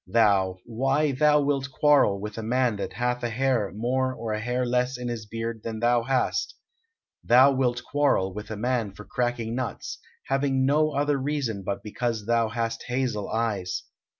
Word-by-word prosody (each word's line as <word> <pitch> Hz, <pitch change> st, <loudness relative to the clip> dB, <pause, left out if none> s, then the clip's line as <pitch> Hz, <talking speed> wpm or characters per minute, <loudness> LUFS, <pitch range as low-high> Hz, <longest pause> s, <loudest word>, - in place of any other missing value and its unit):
"Thou! 95 Hz, -3 st, +3 dB
Why, 135 Hz, +6 st, +1 dB
thou 150 Hz, +2 st, +4 dB
wilt 140 Hz, -1 st, 0 dB
quarrel 140 Hz, -8 st, +3 dB
with 105 Hz, +1 st, -6 dB
a -, -, -3 dB
man 120 Hz, 0 st, +1 dB
that 100 Hz, -, -4 dB
hath 125 Hz, 0 st, -1 dB
a 120 Hz, -, -1 dB
hair 125 Hz, -3 st, 0 dB
more 130 Hz, +4 st, 0 dB
or 115 Hz, -2 st, -4 dB
a 105 Hz, -, -2 dB
hair 125 Hz, +3 st, -1 dB
less 125 Hz, +1 st, 0 dB
in 125 Hz, 0 st, -4 dB
his 115 Hz, -3 st, -5 dB
beard 115 Hz, +1 st, -4 dB
than 110 Hz, -1 st, -4 dB
thou 120 Hz, +1 st, +3 dB
hast; 130 Hz, -, 0 dB, 0.7 s
thou 130 Hz, +4 st, +6 dB
wilt 125 Hz, -3 st, 0 dB
quarrel 135 Hz, -11 st, +1 dB
with 105 Hz, +1 st, -7 dB
a 110 Hz, -, -5 dB
man 115 Hz, -3 st, -1 dB
for 105 Hz, -, -11 dB
cracking 120 Hz, -2 st, -2 dB
nuts, 125 Hz, -1 st, -4 dB, 0.3 s
having 135 Hz, -1 st, +1 dB
no 155 Hz, +3 st, +3 dB
other 145 Hz, 0 st, +1 dB
reason 135 Hz, -7 st, -2 dB
but 100 Hz, +1 st, -4 dB
because 110 Hz, 0 st, -3 dB
thou 115 Hz, 0 st, +2 dB
hast 115 Hz, 0 st, -3 dB
hazel 125 Hz, -5 st, -1 dB
eyes. 110 Hz, -5 st, -1 dB
120 Hz, 180 wpm, -26 LUFS, 110-130 Hz, 0.7 s, thou